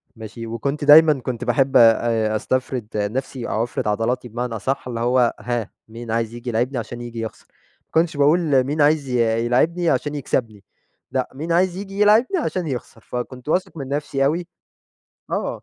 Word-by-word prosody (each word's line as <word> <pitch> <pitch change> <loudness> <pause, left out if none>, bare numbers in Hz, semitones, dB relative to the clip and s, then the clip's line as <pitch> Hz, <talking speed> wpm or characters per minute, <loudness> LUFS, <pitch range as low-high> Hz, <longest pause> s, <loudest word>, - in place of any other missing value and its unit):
ماشي؟ 115 +1 -8
وكنت 140 +6 -3
دايمًا 155 +1 +8
كنت 120 -1 -4
باحب 135 -1 +2
آآ، 115 -1 +4
أسْتفْرد 130 0 -2
نَفْسي 120 +4 -3
أو 110 - 0
أفْرِد 120 - -3
عضلاتي 115 +4 -1
بمعنى 120 0 -4
أصح 130 +5 -2
اللي 120 -2 -4
هو 120 0 +2
هاه 115 -1 -3 0.2
مين 115 +1 -8
عايز 115 0 -1
ييجي 120 +1 -6
يلاعبْني 125 +3 -1
عشان 120 +1 -5
ييجي 120 -1 -7
يخسر، 110 - -7 0.4
ما - - -54
كنتش 160 -2 +1
باقول 145 -2 +3
مين 145 +3 -1
عايز 145 -2 +3
ي 125 - 0 0.3
يلاعبْني 165 +8 +2
عشان 150 -1 0
يكْسبْني، 115 -7 -2 0.5
لأ 130 -1 -1
مين 155 +5 -5
عايز 180 +1 +2
ييجي 195 0 -7
يلاعبني 220 - +4
عشان 185 - -2
يخسر، 125 -4 -6
فكنت 125 +4 -6
واثق 185 0 -1
من 135 - -5
نَفْسي 140 -1 -1
أوي 170 +4 0 0.8
آه. - - -3
130 Hz, 175 wpm, -21 LUFS, 115-150 Hz, 0.8 s, دايمًا